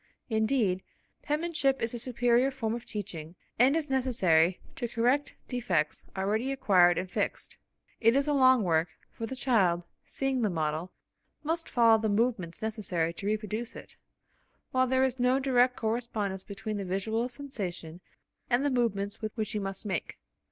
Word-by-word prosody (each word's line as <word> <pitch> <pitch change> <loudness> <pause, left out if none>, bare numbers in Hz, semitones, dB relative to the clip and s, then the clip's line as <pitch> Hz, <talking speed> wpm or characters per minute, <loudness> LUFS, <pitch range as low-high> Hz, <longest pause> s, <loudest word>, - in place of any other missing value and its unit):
Indeed, 220 -4 +1 0.4
penmanship 300 -3 0
is 230 +1 -2
a 240 - -3
superior 245 +1 +2
form 240 -5 -3
of 235 0 -5
teaching 175 -6 -6 0.2
and 260 +4 +5
is 320 -2 0
necessary 190 - +3 0.2
to 240 - -3
correct 245 +5 +1
defects 190 - -1
already 215 +7 0
acquired 185 -9 +4
and 185 - -2
fixed. 180 - -3 0.4
It 230 +1 +4
is 280 +1 +2
a 295 - +2
long 260 -4 +5
work, 165 -1 +2 0.2
for 225 - -5
the 265 - -5
child, 190 -10 +2 0.2
seeing 270 -2 -1
the 215 - +2
model, 160 +1 -2 0.5
must 330 +2 -2
follow 230 -2 +5
the 220 - 0
movements 205 -5 0
necessary 185 -7 -1
to 195 - -6
reproduce 215 +2 -3
it, - - -9 0.8
while 255 0 +2
there 260 +1 +2
is 260 -1 0
no 250 +1 +3
direct 255 -2 +3
correspondence 220 -4 -2
between 210 +1 -5
the 200 - -3
visual 220 +6 -1
sensation 185 - -6 0.5
and 250 +3 +2
the 285 - +2
movements 205 -5 0
which 215 -1 -3
he 210 - -2
must 195 +1 -4
make. 190 -5 -3
225 Hz, 160 wpm, -29 LUFS, 190-255 Hz, 0.8 s, and